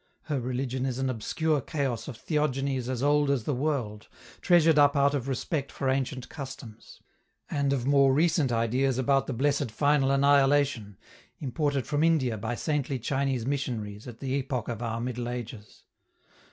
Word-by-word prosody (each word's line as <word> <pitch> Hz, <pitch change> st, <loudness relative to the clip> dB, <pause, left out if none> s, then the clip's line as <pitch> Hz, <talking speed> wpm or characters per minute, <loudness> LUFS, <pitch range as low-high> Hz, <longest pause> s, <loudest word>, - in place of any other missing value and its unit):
Her 145 Hz, -3 st, -2 dB
religion 125 Hz, +1 st, -2 dB
is 125 Hz, -2 st, -3 dB
an 130 Hz, -1 st, 0 dB
obscure 150 Hz, +6 st, -1 dB
chaos 130 Hz, -6 st, -3 dB
of 125 Hz, -, -7 dB
theogonies 135 Hz, -3 st, -1 dB
as 130 Hz, 0 st, -2 dB
old 145 Hz, 0 st, +3 dB
as 140 Hz, -5 st, +1 dB
the 145 Hz, -, -1 dB
world, 125 Hz, -6 st, -2 dB, 0.3 s
treasured 165 Hz, -4 st, +5 dB
up 145 Hz, 0 st, +5 dB
out 140 Hz, 0 st, +3 dB
of 135 Hz, -3 st, -2 dB
respect 140 Hz, +2 st, -2 dB
for 135 Hz, -, -2 dB
ancient 130 Hz, -1 st, -2 dB
customs; 130 Hz, -6 st, -10 dB, 0.5 s
and 140 Hz, -2 st, 0 dB
of 130 Hz, -3 st, -1 dB
more 140 Hz, -1 st, +4 dB
recent 155 Hz, -2 st, +2 dB
ideas 120 Hz, +3 st, +1 dB
about 135 Hz, +1 st, +2 dB
the 135 Hz, -, -2 dB
blessed 140 Hz, +1 st, 0 dB
final 140 Hz, +4 st, +2 dB
annihilation, 140 Hz, -6 st, +3 dB, 0.4 s
imported 140 Hz, -1 st, -1 dB
from 150 Hz, +3 st, 0 dB
India 150 Hz, -8 st, +2 dB
by 110 Hz, +3 st, -3 dB
saintly 145 Hz, -1 st, -1 dB
Chinese 135 Hz, 0 st, -1 dB
missionaries 120 Hz, -6 st, -3 dB
at 120 Hz, -2 st, -10 dB
the 135 Hz, -1 st, -2 dB
epoch 135 Hz, -4 st, -2 dB
of 115 Hz, -1 st, -4 dB
our 115 Hz, -1 st, -2 dB
Middle 120 Hz, 0 st, -3 dB
Ages. 120 Hz, -3 st, -8 dB
135 Hz, 165 wpm, -28 LUFS, 120-145 Hz, 0.5 s, treasured